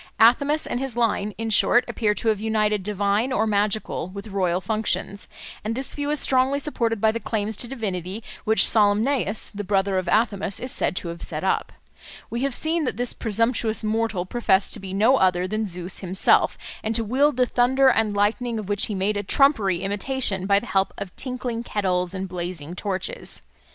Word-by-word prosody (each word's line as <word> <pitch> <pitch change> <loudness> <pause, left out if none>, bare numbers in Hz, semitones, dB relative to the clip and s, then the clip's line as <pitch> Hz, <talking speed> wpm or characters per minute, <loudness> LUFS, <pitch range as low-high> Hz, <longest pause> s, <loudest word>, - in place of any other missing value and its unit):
Athamas 280 +7 +4
and 245 - -3
his 265 -3 -4
line, 210 -3 0
in 225 0 -3
short, 245 +3 +4
appear 210 -3 0
to 225 - -1
have 215 -2 +1
united 215 -1 0
divine 205 +4 0
or 220 -3 +1
magical 210 -3 -1
with 200 +3 -9
royal 185 -3 0
functions; 205 0 -2 0.4
and 220 +2 -2
this 265 +2 -2
view 290 0 -3
is 300 0 +2
strongly 265 +1 +3
supported 235 -6 -1
by 220 +1 +3
the 230 - -4
claims 220 -1 -3
to 240 - 0
divinity 205 -4 -4 0.2
which 220 +1 +5
Salmoneus, 215 +1 +2
the 205 0 -5
brother 195 -1 +1
of 185 - -6
Athamas, 200 -1 +1
is 255 - -5
said 160 - 0
to 175 - -3
have 170 0 -8
set 155 +1 -3
up. 190 - 0 0.6
We 235 - -3
have 275 -2 0
seen 325 +1 0
that - - -3
this 245 0 +2
presumptuous 225 0 0
mortal 215 -4 -1
professed 195 -2 +1
to - - -2
be 190 -1 -8
no 220 +7 +3
other 185 -2 +2
than 215 +2 -2
Zeus 180 0 -3
himself, 185 0 +2 0.3
and 220 +1 -2
to 230 - +2
wield 270 +5 +2
the 250 - +4
thunder 260 +2 +3
and 220 -5 +2
lightning, 225 +3 0
of 215 -3 -5
which 205 0 +2
he 210 - -4
made 200 +2 0
a 205 - -2
trumpery 205 - +2
imitation 200 -1 0
by 200 0 +4
the 240 - -10
help 195 -4 0
of 195 -3 -7
tinkling 250 -3 -4
kettles 185 -5 -1
and 190 0 -4
blazing 175 -3 -5
torches. 200 - -4
215 Hz, 195 wpm, -23 LUFS, 195-240 Hz, 0.6 s, which